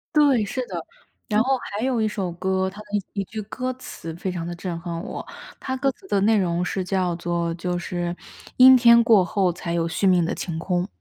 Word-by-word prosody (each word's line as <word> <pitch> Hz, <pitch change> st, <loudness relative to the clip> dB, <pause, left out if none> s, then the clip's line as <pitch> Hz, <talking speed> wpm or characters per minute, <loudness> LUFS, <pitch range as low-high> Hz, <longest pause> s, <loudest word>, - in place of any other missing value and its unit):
对， 275 Hz, -8 st, +4 dB
是 255 Hz, +4 st, -3 dB
的。 175 Hz, -3 st, -4 dB, 0.5 s
然 210 Hz, 0 st, +2 dB
后 265 Hz, 0 st, +2 dB
还 215 Hz, -2 st, -5 dB
有 255 Hz, -3 st, +1 dB
一 220 Hz, -, +2 dB
首 195 Hz, -4 st, -3 dB
歌， 190 Hz, +2 st, -1 dB
它 200 Hz, +2 st, -12 dB
的 210 Hz, -, -10 dB, 0.3 s
一 200 Hz, -, -1 dB
句 215 Hz, +3 st, -6 dB
歌 255 Hz, +5 st, -4 dB
词 165 Hz, -10 st, -8 dB
非 185 Hz, +1 st, -3 dB
常 170 Hz, -2 st, -4 dB
地 175 Hz, -, -5 dB
震 175 Hz, -1 st, -5 dB
撼 170 Hz, -1 st, -5 dB
我。 -, -, -6 dB, 0.3 s
它 260 Hz, -, -3 dB
歌 270 Hz, +1 st, +1 dB
词 380 Hz, -, -19 dB
的 200 Hz, -, +1 dB
内 220 Hz, +1 st, +4 dB
容 175 Hz, -2 st, 0 dB
是 190 Hz, +1 st, -2 dB
叫 185 Hz, -2 st, 0 dB
做 170 Hz, -1 st, -1 dB
就 180 Hz, 0 st, -2 dB
是 175 Hz, 0 st, -3 dB, 0.4 s
“阴 260 Hz, 0 st, +9 dB
天 235 Hz, -1 st, +7 dB
过 215 Hz, -5 st, +5 dB
后 185 Hz, 0 st, +1 dB
才 170 Hz, 0 st, -5 dB
有 170 Hz, -1 st, +1 dB
续 195 Hz, -, 0 dB
命 180 Hz, -2 st, +4 dB
的 165 Hz, -, -1 dB
晴 170 Hz, -3 st, -4 dB
空”。 180 Hz, +2 st, -1 dB
190 Hz, 240 characters per minute, -23 LUFS, 175-225 Hz, 0.5 s, 阴